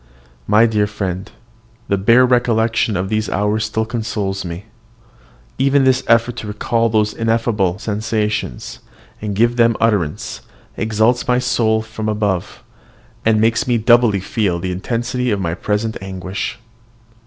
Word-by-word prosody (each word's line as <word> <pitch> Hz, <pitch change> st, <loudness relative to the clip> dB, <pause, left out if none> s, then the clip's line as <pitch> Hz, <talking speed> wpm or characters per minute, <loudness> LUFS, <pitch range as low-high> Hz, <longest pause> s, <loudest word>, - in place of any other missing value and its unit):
My 110 Hz, +2 st, +5 dB
dear 105 Hz, -2 st, +1 dB
friend, 95 Hz, -3 st, -4 dB, 0.6 s
the 100 Hz, -, +2 dB
bare 115 Hz, +6 st, +5 dB
recollection 115 Hz, -4 st, +1 dB
of 95 Hz, +1 st, -2 dB
those 110 Hz, 0 st, -1 dB
hours 105 Hz, +2 st, 0 dB
still 110 Hz, +1 st, -1 dB
consoles 110 Hz, -4 st, -3 dB
me. 90 Hz, +3 st, -7 dB, 0.9 s
Even 135 Hz, +1 st, +3 dB
this 130 Hz, -1 st, +3 dB
effort 115 Hz, +1 st, +3 dB
to 105 Hz, -, -6 dB
recall 115 Hz, +2 st, 0 dB
those 105 Hz, -1 st, +1 dB
ineffable 115 Hz, -5 st, 0 dB
sensations, 105 Hz, -, -3 dB, 0.4 s
and 105 Hz, -2 st, -3 dB
give 120 Hz, +3 st, +2 dB
them 115 Hz, -1 st, +3 dB
utterance, 100 Hz, -10 st, -1 dB, 0.3 s
exalts 110 Hz, +3 st, +1 dB
my 125 Hz, 0 st, +3 dB
soul 110 Hz, -3 st, +1 dB
above 105 Hz, -4 st, 0 dB
itself, -, -, -17 dB, 0.6 s
and 110 Hz, -1 st, +4 dB
makes 115 Hz, +2 st, +2 dB
me 120 Hz, -1 st, +2 dB
doubly 120 Hz, -2 st, +4 dB
feel 100 Hz, -3 st, -1 dB
the 90 Hz, +2 st, -3 dB
intensity 120 Hz, +6 st, -2 dB
of 105 Hz, -3 st, 0 dB
my 85 Hz, -3 st, -2 dB
present 105 Hz, +4 st, -2 dB
anguish. 95 Hz, +1 st, -5 dB
110 Hz, 140 wpm, -18 LUFS, 100-115 Hz, 0.9 s, My